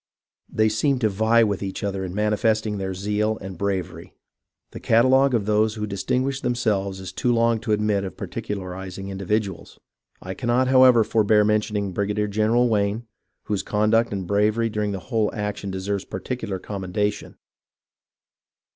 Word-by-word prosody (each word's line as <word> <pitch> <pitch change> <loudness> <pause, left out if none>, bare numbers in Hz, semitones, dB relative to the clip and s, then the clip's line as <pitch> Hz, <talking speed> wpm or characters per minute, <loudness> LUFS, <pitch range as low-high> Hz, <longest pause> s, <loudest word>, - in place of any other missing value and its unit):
They 110 0 +2
seemed 125 +5 +1
to 110 - +3
vie 110 +3 +3
with 100 -3 -1
each 100 +2 -5
other 95 -1 -2
in 90 0 -5
manifesting 105 0 0
their 95 -1 -3
zeal 105 +3 -1
and 95 -1 -8
bravery. 95 -1 -4 0.6
The - - -8
catalogue 130 +3 +4
of 105 -4 0
those 105 +1 +2
who 105 -1 -3
distinguished 130 +7 -1
themselves 105 -6 -1
is 95 -1 -7
too 125 - 0
long 115 -1 +2
to 110 0 -4
admit 105 -1 +1
of 95 -3 -7
particularizing 95 -1 -6
individuals. 100 0 -3 0.4
I 95 - -6
cannot, 125 +3 +1
however, 130 -3 +6
forbear 105 -1 +3
mentioning 105 -2 0
Brigadier 105 +2 -1
General 110 +4 +2
Wayne, 105 +1 0 0.4
whose 105 -3 -2
conduct 110 +2 +1
and 95 -2 -3
bravery 105 +4 +1
during 105 -1 -1
the 100 - -4
whole 110 -3 +2
action 105 -1 -4
deserve 95 +1 -3
par - - -5
ticular 105 -7 -4
commendation. 100 +2 -3
105 Hz, 155 wpm, -23 LUFS, 100-115 Hz, 0.6 s, however